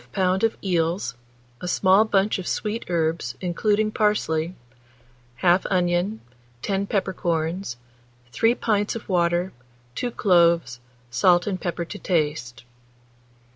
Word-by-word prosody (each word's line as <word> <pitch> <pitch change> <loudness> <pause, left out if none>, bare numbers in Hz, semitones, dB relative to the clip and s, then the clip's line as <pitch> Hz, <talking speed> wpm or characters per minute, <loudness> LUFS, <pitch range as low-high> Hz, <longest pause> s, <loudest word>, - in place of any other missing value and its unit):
of 190 +4 +1
eels, 175 -1 0 0.5
a 180 - -4
small 190 +3 +4
bunch 200 -1 +1
of 180 - -6
sweet 215 +2 -2
herbs, 160 -7 -1
including 210 +4 0
parsley; 180 -6 0 0.9
1/2 180 +1 +4
onion, 180 +3 0 0.4
10 200 0 -1
peppercorns, 175 - -2 0.5
3 230 - +2
pints 210 -3 0
of 230 - -7
water, 175 0 +1 0.4
2 245 - -2
cloves, 170 - +3 0.3
salt 175 +8 +4
and 190 -3 -3
pepper 175 -1 -3
to 205 +4 -8
taste. 150 -9 -1
180 Hz, 110 wpm, -24 LUFS, 170-205 Hz, 0.9 s, small